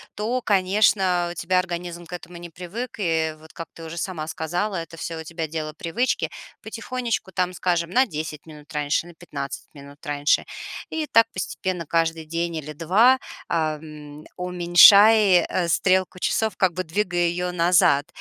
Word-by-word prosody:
то, 235 +5 -2
конечно, 190 -3 +2
у 175 - -9
тебя 185 +1 +1
организм 175 -1 -5
к - - -11
этому 175 0 -8
не 170 0 -9
привык, 185 +9 -7
и, 160 -4 0
вот, 160 +1 -17
как 165 - -7
ты 165 - -11
уже 160 +1 -8
сама 170 -3 -4
сказала, 175 +5 -2
это 165 0 -7
всё 165 0 -5
у - - -8
тебя 165 -1 -5
дело 155 -1 -5
привычки, 200 +11 -1 0.3
потихонечку, 230 -1 -4
там, 180 -1 -1
скажем, 175 -1 -1
на 260 +5 +4
10 155 -3 -6
минут 150 0 -13
раньше, 150 +2 0
на 175 - -13
15 140 -4 -7
минут 140 +1 -14
раньше. 145 0 +1 0.5
И 320 -1 -2
так 230 -6 +4
постепенно 185 -2 -3
каждый 165 0 0
день 170 +1 -3
или 155 -1 -6
2, 210 - +4 0.3
ам, 155 -2 -4
уменьшай, 180 +2 +6
э, 175 -2 -1
стрелку 185 +2 +1
часов, 220 +4 0
как 185 -3 +2
бы 185 - -3
двигай 175 0 0
ее 180 +1 -2
назад. 170 -4 +3
175 Hz, 165 wpm, -23 LUFS, 160-185 Hz, 0.5 s, уменьшай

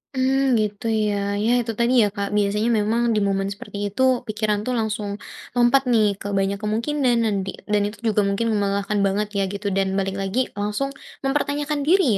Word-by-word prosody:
Mmm, 265 0 +2
gitu 210 0 -3
ya. 215 -2 +1 0.3
Ya 230 - +2
itu 230 -1 -2
tadi 235 +2 +3
ya, 210 - +4
Kak, 200 -1 -2
biasanya 210 +3 +1
memang 220 +3 +1
di - - +3
momen 195 0 0
seperti 200 - -9
itu, 210 - -3 0.3
pikiran 215 -1 0
tuh 255 - -1
langsung 210 -2 -2 0.5
lompat 245 +3 +4
nih 220 -3 +4
ke - - -6
banyak 195 +1 0
kemungkinan 240 +4 +1
dan 210 -2 +1
di 190 - -3 0.2
dan 210 -1 +3
itu 210 - -9
juga 210 -1 +3
mungkin 230 +4 0
melelahkan 200 0 0
banget 200 +2 0
ya 195 - +2
gitu. 200 +1 -4
Dan 195 0 +2
balik 195 0 -2
lagi, 195 +5 -1 0.2
langsung 210 +7 -1 0.3
mempertanyakan 290 +1 -1
diri 380 +4 +5
210 Hz, 185 wpm, -22 LUFS, 200-245 Hz, 0.5 s, diri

